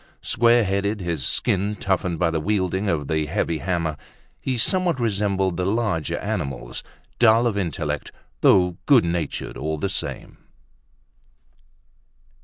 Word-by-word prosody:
Square 120 Hz, 0 st, +4 dB
headed, 100 Hz, +2 st, -1 dB
his 85 Hz, -6 st, -2 dB
skin 100 Hz, +10 st, 0 dB
toughened 95 Hz, -3 st, -1 dB
by 85 Hz, +1 st, +1 dB
the 80 Hz, -, 0 dB
wielding 95 Hz, +1 st, 0 dB
of 75 Hz, -5 st, -1 dB
the 80 Hz, -1 st, 0 dB
heavy 85 Hz, -2 st, -1 dB
hammer, 85 Hz, -2 st, -1 dB, 0.4 s
he 130 Hz, -2 st, -2 dB
somewhat 175 Hz, +5 st, +2 dB
resembled 100 Hz, -5 st, 0 dB
the 90 Hz, -, -1 dB
larger 105 Hz, -7 st, 0 dB
animals: -, -, -4 dB, 0.4 s
dull 115 Hz, 0 st, +5 dB
of 115 Hz, -4 st, +1 dB
intellect, 75 Hz, -6 st, -2 dB, 0.3 s
though 90 Hz, -2 st, +4 dB
good 135 Hz, -8 st, +6 dB
natured 85 Hz, -3 st, -3 dB
all 80 Hz, +2 st, -2 dB
the 95 Hz, +6 st, -2 dB
same. 95 Hz, -, -5 dB
95 Hz, 130 wpm, -23 LUFS, 80-105 Hz, 0.4 s, good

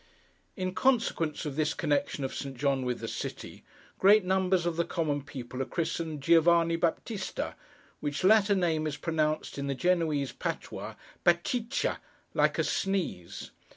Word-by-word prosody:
In 185 Hz, -1 st, -2 dB
consequence 220 Hz, -, +1 dB
of 145 Hz, -3 st, -4 dB
this 155 Hz, +1 st, 0 dB
connection 145 Hz, -2 st, 0 dB
of 135 Hz, -, -3 dB
Saint 135 Hz, -2 st, -5 dB
John 135 Hz, -1 st, +1 dB
with 125 Hz, -1 st, -2 dB
the -, -, -4 dB
city, -, -, -6 dB, 0.4 s
great 205 Hz, +2 st, +6 dB
numbers 185 Hz, -1 st, +2 dB
of 170 Hz, -1 st, 0 dB
the 170 Hz, -, +1 dB
common 155 Hz, -5 st, -1 dB
people 130 Hz, -2 st, -7 dB
are -, -, 0 dB
christened 160 Hz, +1 st, -3 dB
Giovanni 170 Hz, +1 st, +5 dB
Baptista, 175 Hz, +5 st, -2 dB, 0.5 s
which 145 Hz, +4 st, -3 dB
latter 205 Hz, +1 st, +5 dB
name 160 Hz, -4 st, +1 dB
is 150 Hz, -, -3 dB
pronounced 155 Hz, -3 st, -1 dB
in 140 Hz, -, -3 dB
the 140 Hz, -, -1 dB
Genoese 155 Hz, -3 st, +1 dB
patois -, -, -5 dB, 0.3 s
'Batcheetcha,' 225 Hz, +9 st, +1 dB, 0.3 s
like -, -, +2 dB
a -, -, +2 dB
sneeze. 180 Hz, -, -2 dB
165 Hz, 150 wpm, -29 LUFS, 145-185 Hz, 0.5 s, great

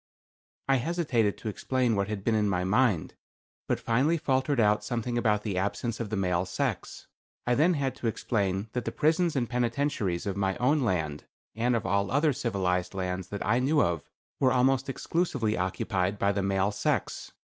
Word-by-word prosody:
I 135 Hz, 0 st, +4 dB
hesitated 130 Hz, -, 0 dB
to -, -, -8 dB
explain 125 Hz, +2 st, 0 dB
what 100 Hz, -1 st, 0 dB
had 105 Hz, -2 st, -4 dB
been 115 Hz, -, +1 dB
in 105 Hz, -1 st, +2 dB
my 90 Hz, -2 st, 0 dB
mind, 105 Hz, -2 st, +2 dB, 0.5 s
but -, -, 0 dB
finally 135 Hz, +9 st, +2 dB
faltered 135 Hz, -3 st, 0 dB
out 105 Hz, -1 st, +3 dB
something 120 Hz, +2 st, -2 dB
about 105 Hz, -3 st, +1 dB
the 100 Hz, -4 st, -1 dB
absence 110 Hz, +4 st, -2 dB
of 115 Hz, -3 st, -3 dB
the 110 Hz, -, -2 dB
male 90 Hz, -3 st, +1 dB
sex. 90 Hz, -, -3 dB, 0.4 s
I 125 Hz, -, +2 dB
then 165 Hz, +7 st, +3 dB
had 135 Hz, -3 st, -1 dB
to 120 Hz, -, -3 dB
explain 100 Hz, -3 st, -1 dB
that 125 Hz, -2 st, -2 dB
the -, -, -2 dB
prisons 165 Hz, +2 st, +2 dB
and 125 Hz, -3 st, 0 dB
penitentiaries 120 Hz, -6 st, -1 dB
of 100 Hz, -2 st, -2 dB
my 95 Hz, -1 st, 0 dB
own 140 Hz, +5 st, +2 dB
land, 80 Hz, -, -1 dB, 0.3 s
and 120 Hz, +3 st, +1 dB
of 115 Hz, -, -2 dB
all 100 Hz, +1 st, +1 dB
other 145 Hz, +2 st, +2 dB
civilized 95 Hz, -8 st, -1 dB
lands 90 Hz, -1 st, -3 dB
that 100 Hz, +2 st, -5 dB
I 115 Hz, +3 st, +3 dB
knew 145 Hz, +4 st, +2 dB
of, 85 Hz, -, 0 dB, 0.3 s
were 130 Hz, -2 st, +4 dB
almost 135 Hz, +2 st, +2 dB
exclusively 135 Hz, -7 st, -1 dB
occupied 95 Hz, +1 st, -1 dB
by 100 Hz, 0 st, +2 dB
the 100 Hz, 0 st, -1 dB
male 95 Hz, +1 st, +1 dB
sex. 105 Hz, -, -2 dB
110 Hz, 185 wpm, -28 LUFS, 95-130 Hz, 0.5 s, I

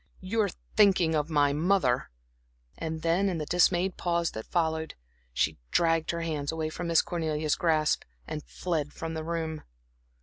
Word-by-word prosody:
"You're 205 Hz, +2 st, 0 dB, 0.3 s
thinking 190 Hz, -6 st, +5 dB
of 150 Hz, 0 st, 0 dB
my 145 Hz, -2 st, +3 dB
mother." 150 Hz, -6 st, +2 dB, 0.7 s
And 160 Hz, -1 st, -5 dB
then, 175 Hz, +4 st, +2 dB
in 180 Hz, -, -2 dB
the 155 Hz, -, -3 dB
dismayed 180 Hz, +2 st, +2 dB
pause 170 Hz, -1 st, 0 dB
that 110 Hz, -, -7 dB
followed, 160 Hz, -2 st, -1 dB, 0.4 s
she -, -, 0 dB
dragged 165 Hz, -1 st, +2 dB
her 170 Hz, 0 st, -1 dB
hands 155 Hz, -3 st, -2 dB
away 160 Hz, -1 st, -2 dB
from 170 Hz, +2 st, -5 dB
Miss 165 Hz, -1 st, +4 dB
Cornelia's 155 Hz, -3 st, -1 dB
grasp 155 Hz, -3 st, +2 dB, 0.2 s
and 150 Hz, -1 st, -5 dB
fled 155 Hz, -5 st, -3 dB
from 165 Hz, 0 st, -5 dB
the 160 Hz, -1 st, -4 dB
room. 160 Hz, -1 st, -3 dB
160 Hz, 160 wpm, -28 LUFS, 155-175 Hz, 0.7 s, thinking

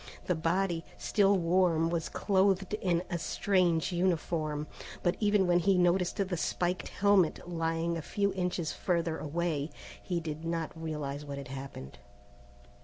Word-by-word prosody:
The 180 Hz, -, +2 dB
body, 170 Hz, +1 st, 0 dB
still 200 Hz, -1 st, +3 dB
warm, 170 Hz, -2 st, +2 dB
was 165 Hz, -2 st, -1 dB
clothed 195 Hz, -1 st, +1 dB
in 180 Hz, -5 st, +1 dB
a 170 Hz, -, -1 dB
strange 180 Hz, -2 st, +1 dB
uniform, 160 Hz, -4 st, 0 dB, 0.4 s
but 175 Hz, 0 st, +2 dB
even 205 Hz, -2 st, +3 dB
when 175 Hz, 0 st, +4 dB
he 190 Hz, +1 st, +3 dB
noticed 180 Hz, 0 st, +2 dB
the 190 Hz, -3 st, -1 dB
spiked 175 Hz, +1 st, -1 dB
helmet 200 Hz, -4 st, +2 dB
lying 165 Hz, 0 st, -1 dB
a -, -, -3 dB
few 200 Hz, +4 st, 0 dB
inches 180 Hz, -4 st, -1 dB
further 170 Hz, -3 st, -1 dB
away, 155 Hz, -1 st, -1 dB, 0.3 s
he 175 Hz, -2 st, -2 dB
did 160 Hz, -1 st, -5 dB
not 165 Hz, -1 st, -2 dB
realize 150 Hz, -3 st, -4 dB
what 140 Hz, -1 st, -6 dB
had 140 Hz, -2 st, -7 dB
happened. 135 Hz, -, -8 dB
170 Hz, 145 wpm, -31 LUFS, 160-185 Hz, 0.4 s, when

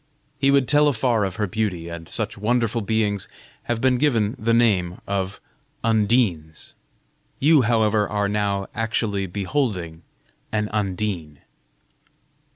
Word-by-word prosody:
He 135 Hz, +1 st, +3 dB
would 140 Hz, -2 st, +3 dB
tell 150 Hz, 0 st, +4 dB
afar 120 Hz, -4 st, +1 dB
of 95 Hz, -2 st, -4 dB
her 105 Hz, -, 0 dB
beauty, 95 Hz, -4 st, -2 dB
and 85 Hz, -1 st, -8 dB
such -, -, -1 dB
wonderful 115 Hz, +2 st, 0 dB
beings 105 Hz, -1 st, 0 dB, 0.4 s
have 120 Hz, -1 st, -2 dB
been 130 Hz, -1 st, +3 dB
given 115 Hz, -6 st, +1 dB
the 115 Hz, +1 st, 0 dB
name 100 Hz, -7 st, +2 dB
of 100 Hz, 0 st, -3 dB, 0.4 s
Undines. 105 Hz, -8 st, 0 dB, 0.7 s
You, 150 Hz, +1 st, +5 dB
however, 110 Hz, -3 st, +2 dB
are 105 Hz, -1 st, 0 dB
now 100 Hz, -1 st, -1 dB
actually 105 Hz, -3 st, -1 dB
beholding 95 Hz, -, -2 dB, 0.5 s
an 105 Hz, -1 st, -1 dB
Undine." 95 Hz, -7 st, -3 dB
105 Hz, 125 wpm, -23 LUFS, 95-115 Hz, 0.7 s, You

